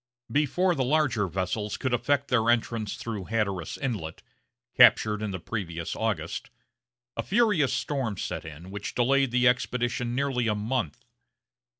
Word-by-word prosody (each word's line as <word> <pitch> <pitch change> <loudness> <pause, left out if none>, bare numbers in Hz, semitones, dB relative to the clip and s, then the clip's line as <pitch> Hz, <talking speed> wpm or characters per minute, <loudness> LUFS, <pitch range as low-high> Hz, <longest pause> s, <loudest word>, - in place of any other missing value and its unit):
Before 165 +6 +2
the 135 -5 0
larger 130 -7 +2
vessels 95 +4 -2
could 130 -2 -1
effect 140 +3 +1
their 115 -2 +2
entrance 115 -2 0
through 105 -5 -5
Hatteras 100 -6 -2
Inlet, 105 -12 -4 0.5
captured 105 -1 +6
in 110 - -2
the 95 -2 -4
previous 85 -5 -4
August, - - -2 0.7
a - - -1
furious 205 - +2
storm 130 -9 -2
set - - -4
in, 80 +4 -10
which 100 0 -5
delayed 135 +2 +3
the 125 +1 +3
expedition 120 -1 0
nearly 130 -3 0
a 105 - +1
month. 105 - -2
120 Hz, 140 wpm, -27 LUFS, 105-135 Hz, 0.7 s, captured